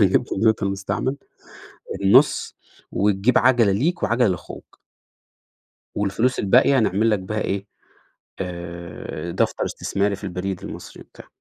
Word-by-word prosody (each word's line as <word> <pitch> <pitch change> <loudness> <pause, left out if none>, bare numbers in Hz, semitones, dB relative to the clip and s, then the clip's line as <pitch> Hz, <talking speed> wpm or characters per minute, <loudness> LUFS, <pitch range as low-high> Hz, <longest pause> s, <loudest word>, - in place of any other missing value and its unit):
هنجيب 95 -3 +4
كمبيوتر 110 0 +1
مستعمل 100 +7 -2 0.9
النُص 125 +9 +4 0.4
وتجيب 100 +4 +2
عَجَلة 120 -6 +4
ليك 160 - 0
وعجلة 120 0 +3
لأخوك." 90 -3 -7 1.1
والفلوس 105 +5 0
الباقية 130 +7 +4
نعمل 110 +1 +2
لك 105 - +2
بيها 105 +3 -4
إيه، 100 0 -2 0.7
آآ 85 -1 -6
دفتر - - 0
استثماري 100 0 -1
في - - -16
البريد 95 0 -4
المصري - - -9
وبتاع. - - -16
100 Hz, 115 wpm, -22 LUFS, 95-115 Hz, 1.1 s, هنجيب